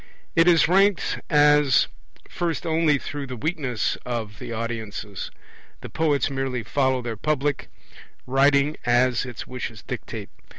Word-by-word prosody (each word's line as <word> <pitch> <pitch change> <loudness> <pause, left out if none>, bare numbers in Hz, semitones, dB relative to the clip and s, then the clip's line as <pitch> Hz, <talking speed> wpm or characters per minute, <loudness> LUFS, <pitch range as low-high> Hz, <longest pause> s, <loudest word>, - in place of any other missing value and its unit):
It 165 +1 +5
is 170 -3 +6
ranked 195 +2 +3
as 150 -3 +5 0.4
first 170 -1 -3
only 160 -2 +3
through 140 0 -6
the 130 - -5
weakness 135 -4 -1
of 110 -4 -4
the - - -7
audiences; 110 -3 -5 0.5
the - - -9
poets 150 -3 +1
merely 135 -3 -2
follow 130 +2 0
their 115 -2 -3
public, 145 +3 -1 0.6
writing 140 +3 +3
as 125 0 +2
its 120 -2 -7
wishes 120 -4 -6
dictate. - - -6
135 Hz, 130 wpm, -24 LUFS, 120-150 Hz, 0.6 s, is